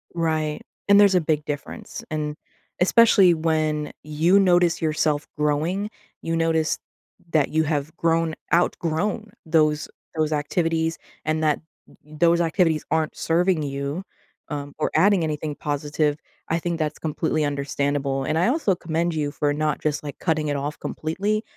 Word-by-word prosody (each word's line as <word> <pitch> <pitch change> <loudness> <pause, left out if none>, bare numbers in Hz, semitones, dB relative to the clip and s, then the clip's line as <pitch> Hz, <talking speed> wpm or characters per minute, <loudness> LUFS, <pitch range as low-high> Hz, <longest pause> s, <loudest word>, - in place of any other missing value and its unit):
Right, 155 -2 -1 0.3
and 200 0 +7
there's 200 -2 +6
a 180 - +4
big 155 -2 0
difference, 145 -1 -6
and 150 -1 -2 0.5
especially 195 -2 +6
when, 155 -2 0
you 160 +6 +3
notice 175 -3 +3
yourself 155 -1 0
growing, 155 +7 0 0.3
you 165 - -2
notice, 165 -1 +1 0.6
that 150 -3 +3
you 160 +1 +2
have 150 0 -2
grown 165 -1 +1 0.2
outgrown 180 +5 0 0.2
those 155 -2 +2 0.3
those 155 -1 0
activities 165 +2 0 0.3
and 155 0 0
that 150 -1 +2 0.5
th 155 0 -13
those 170 0 +4
activities 165 -2 +1
aren't 160 -1 +1
serving 175 0 +2
you, 140 +4 -3 0.4
um, 145 -1 -5
or - - +1
adding 190 +2 +4
anything 150 -1 -3
positive, 145 +1 -1 0.3
I 165 - 0
think 170 0 -2
that's 155 -1 -1
completely 155 0 -1
understandable, 140 -1 -1
and 155 +4 0
I 175 - +3
also 255 -6 +2
commend 170 0 -1
you 150 -2 -1
for 145 0 0
not 150 0 -1
just, 150 -1 -1
like, 145 -1 -7
cutting 155 -3 0
it 145 - 0
off 145 +2 -4
completely, 200 +7 -2
155 Hz, 150 wpm, -24 LUFS, 150-170 Hz, 0.6 s, and